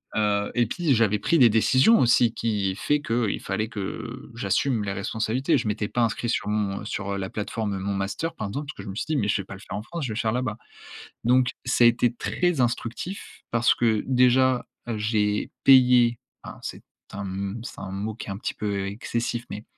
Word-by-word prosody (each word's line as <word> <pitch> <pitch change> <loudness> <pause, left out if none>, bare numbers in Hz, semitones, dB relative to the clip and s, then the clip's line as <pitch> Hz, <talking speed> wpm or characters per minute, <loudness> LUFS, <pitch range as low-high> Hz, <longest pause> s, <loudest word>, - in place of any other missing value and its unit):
Heu 105 -1 +1
et 120 -1 +3
pis 155 - +1
j'avais 105 -2 +2
pris 170 - +2
des 125 -6 +7
décisions 130 - +5
aussi 120 -1 +4
qui 105 -5 -1
fait 145 +7 +1
qu'il 115 -5 -1
fallait 105 +3 -2
que 115 +5 -6
j'assume 120 -1 0
les 100 - -2
responsabilités. 110 +7 0
Je 120 - -2
m'étais 105 0 -1
pas 125 - 0
inscrit 115 +1 -1
sur 115 - -1
mon 105 -1 -1
sur, 100 -1 -4
heu, 100 - -2
la 95 -1 -4
plateforme 105 -1 -3
Mon 100 +1 -2
Master 100 +12 -2
par 110 - -4
exemple, 140 +9 -5
parce 150 - -8
que 100 - -7
je - - -10
me 95 - -6
suis - - -2
dit: 155 - +1
«Mais 105 -6 0
je 105 -1 +1
vais - - -11
pas 100 - -9
le - - -12
faire - - -7
en - - -4
France, 165 +5 -5
je - - -3
vais - - -6
le - - -2
faire 110 -2 +1
là-bas». 125 -2 -1 0.7
Donc 125 +1 +4 0.2
ça 125 -1 +3
a - - +9
été 120 0 +3
très 175 +2 0
instructif, 120 - -3
parce 115 0 +3
que, 110 -3 +1
déjà, 125 0 +4 0.2
heu, 115 - -2
j'ai 105 -1 0
payé, 125 -3 +6 0.3
hein, - - -9
c'est - - -6 0.3
un 100 - -5
m 100 +3 -4
c'est - - -8
un 95 - -6
mot 105 +3 -4
qui - - -8
est - - -4
un 95 - -4
petit - - -4
peu 100 -2 -2
excessif, 115 +3 -3
mais. 105 - -6
115 Hz, 230 wpm, -25 LUFS, 105-125 Hz, 0.7 s, a